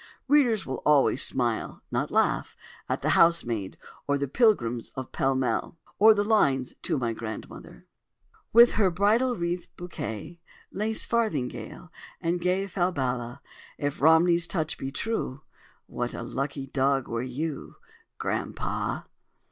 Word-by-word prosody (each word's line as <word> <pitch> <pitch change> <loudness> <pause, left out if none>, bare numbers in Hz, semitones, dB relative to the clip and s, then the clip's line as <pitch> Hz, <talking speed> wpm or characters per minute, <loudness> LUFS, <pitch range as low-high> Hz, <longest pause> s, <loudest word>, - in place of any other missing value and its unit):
Readers 255 -7 +3
will 130 - -5
always 145 -3 +4
smile 120 -3 -1
(not - - -1
laugh) - - 0 0.3
at - - -2
"The - - +1
Housemaid" 120 - +2 0.3
or 140 0 +2
"The 140 0 -2
Pilgrims 130 - +1
of 130 -2 -6
Pall 135 0 +1
Mall" 130 +5 -1 0.2
or 220 +1 +8
the 205 - +1
lines 140 - +2
"To - - -1
my 120 -3 -1
Grandmother"— 110 - -8 0.7
"With 235 +2 +8
her 200 -4 +2
bridal 215 +8 +2
wreath, 175 -1 -3
bouquet, 170 - -6 0.3
Lace 215 +3 0
farthingale, 155 - -2 0.3
and 175 0 -1
gay 180 +2 +1
Falbala,— 130 -11 -2 0.4
If 145 -2 -3
Romney's 170 +3 +5
touch 160 -4 -1
be 135 - -4
true, 155 - -3 0.4
What 120 0 -4
a - - -5
lucky 135 +3 -4
dog 135 -1 0
were 115 0 -2
you, 140 +4 -5 0.4
Grandpapa! - - -3
150 Hz, 130 wpm, -27 LUFS, 130-190 Hz, 0.7 s, or